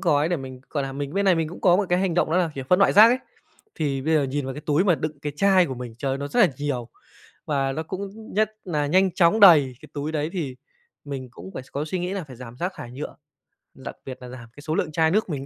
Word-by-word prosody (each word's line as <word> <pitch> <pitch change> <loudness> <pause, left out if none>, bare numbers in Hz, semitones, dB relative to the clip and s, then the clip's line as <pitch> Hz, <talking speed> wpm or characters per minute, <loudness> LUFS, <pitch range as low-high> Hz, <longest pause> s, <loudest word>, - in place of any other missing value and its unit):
gói 155 -4 +2
để 175 - 0
mình, 130 -3 -8
gọi 145 -3 -1
là, 135 - -4
mình 140 +1 -5
bên 200 - +1
này 190 -2 +5
mình 165 -2 -1
cũng 175 - -10
có 180 -2 +5
một 205 - +1
cái 180 +1 +2
hành 185 -3 0
động 175 - +1
đó 165 - +2
là, 175 -3 +2
kiểu, 135 -1 -5
phân 180 - +5
loại 195 - +4
rác 215 +2 +9
ấy. 250 +2 +2 0.6
Thì 140 -3 -1
bây 160 +3 +1
giờ 150 - +4
nhìn 140 +1 -2
vào 135 0 -4
cái 150 - -7
túi 150 +4 +1
mà 180 -4 +4
đựng 155 0 -4
cái 150 - -3
chai 190 +1 +4
của 130 - -4
mình, 120 -2 -8
trời 135 +2 -2
ơi, 135 - -2
nó 140 +1 -4
rất 240 - +1
là 195 - +6
nhiều 135 -5 -3 0.6
và 135 -2 0
nó 155 - -3
cũng 200 +5 -7
nhất 215 +1 +2
nà 150 -5 -1
nhanh 185 +5 +3
chóng 185 +3 +3
đầy 150 -10 +7
cái 155 - -13
túi 150 +2 -3
đấy, 155 0 -1
thì 145 -9 -4 0.5
mình 135 -3 -6
cũng 95 -4 -11
phải - - -5
có 145 - -2
suy 170 +4 -3
nghĩ 180 +1 -3
là 195 -3 -3
phải 130 -4 -12
giảm 120 -1 -10
rác 180 +7 -2
thải 120 - -8
nhựa, 135 +4 -7 0.6
đặc 130 - -9
biệt 130 -1 -7
là 125 - -9
giảm 125 -2 -10
cái 145 - -12
số 155 +2 -2
lượng 160 - -1
chai 160 +1 +2
nước 210 +1 +1
mình 140 -4 -4
155 Hz, 290 wpm, -24 LUFS, 135-180 Hz, 0.6 s, rác